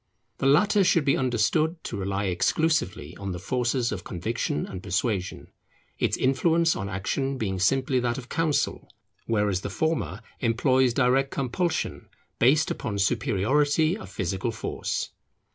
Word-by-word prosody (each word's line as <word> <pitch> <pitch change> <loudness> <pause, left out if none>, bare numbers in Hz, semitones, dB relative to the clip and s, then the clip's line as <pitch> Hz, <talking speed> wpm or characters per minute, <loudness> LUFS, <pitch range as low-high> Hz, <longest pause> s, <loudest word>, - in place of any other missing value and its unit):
The - - +1
latter 200 +8 +4
should 165 -4 +3
be 135 - +4
understood 130 +6 +1
to - - -5
rely 100 +1 -2
exclusively 90 - 0
on 100 -2 -4
the 90 - -5
forces 120 +3 0
of 95 -4 -4
conviction 85 -3 -2
and 95 -2 -7
persuasion; 95 0 -2 0.5
its - - +1
influence 165 +5 +2
on 95 0 -4
action 135 +9 -2
being 95 -5 -2
simply 130 +6 +2
that 120 -1 -1
of 125 -2 -7
counsel; 160 -1 -1 0.4
whereas 105 -4 +1
the 100 - -4
former 160 +9 -1 0.2
employs 130 +1 +2
direct 135 +1 +3
compulsion, 140 +7 -2 0.3
based 150 +6 +4
upon 100 - -3
superiority 135 - +2
of 220 - -9
physical 95 +5 -2
force. 115 - -3
125 Hz, 140 wpm, -26 LUFS, 100-145 Hz, 0.5 s, latter